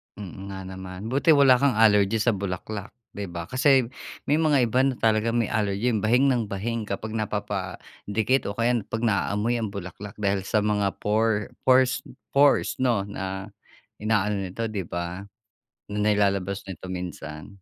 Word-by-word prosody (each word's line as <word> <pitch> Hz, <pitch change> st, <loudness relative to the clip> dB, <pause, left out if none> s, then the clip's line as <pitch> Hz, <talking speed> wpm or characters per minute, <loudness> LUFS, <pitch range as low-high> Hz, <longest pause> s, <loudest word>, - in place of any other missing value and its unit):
Mm, 95 Hz, -1 st, -8 dB
nga 95 Hz, 0 st, -6 dB
naman 95 Hz, +3 st, -7 dB
buti 145 Hz, +3 st, +4 dB
wala 130 Hz, -3 st, +6 dB
kang 140 Hz, -5 st, +3 dB
allergy 105 Hz, -1 st, +4 dB
sa 120 Hz, +1 st, +3 dB
bulaklak, 100 Hz, +1 st, -5 dB, 0.2 s
'di 100 Hz, -1 st, -5 dB
ba? 85 Hz, -1 st, -5 dB
Kasi 130 Hz, -2 st, +3 dB, 0.3 s
may 150 Hz, +2 st, +2 dB
mga 150 Hz, -5 st, +3 dB
iba 120 Hz, +2 st, +1 dB
na 135 Hz, -2 st, +1 dB
talagang 110 Hz, +1 st, +1 dB
may 110 Hz, -, -2 dB
allergy 105 Hz, +2 st, 0 dB
bahing 120 Hz, +6 st, +3 dB
ng 115 Hz, -4 st, 0 dB
bahing 110 Hz, +2 st, -3 dB
kapag 110 Hz, +2 st, -4 dB
napapadikit 105 Hz, +3 st, -2 dB
o 100 Hz, -, -4 dB
kaya 120 Hz, +1 st, +2 dB
pag 115 Hz, +1 st, -4 dB
na-aamoy 110 Hz, +2 st, +1 dB
ang 110 Hz, -, -1 dB
bulaklak 100 Hz, +2 st, -7 dB
dahil 100 Hz, -2 st, 0 dB
sa 105 Hz, -1 st, +2 dB
mga 105 Hz, -2 st, 0 dB
por 105 Hz, 0 st, +1 dB, 0.2 s
porse 130 Hz, +2 st, +4 dB, 0.3 s
pores, 140 Hz, -1 st, +3 dB
'no? 120 Hz, -6 st, +2 dB
Na 95 Hz, 0 st, -5 dB, 0.5 s
inaano 105 Hz, -2 st, 0 dB
ito, 105 Hz, +6 st, -5 dB
'di 95 Hz, -5 st, -3 dB
ba? 85 Hz, +3 st, -4 dB, 0.7 s
Na 105 Hz, +1 st, 0 dB
ilalabas 100 Hz, -1 st, 0 dB
nito 95 Hz, 0 st, -7 dB
minsan? 85 Hz, -4 st, -6 dB
105 Hz, 155 wpm, -25 LUFS, 100-115 Hz, 0.7 s, wala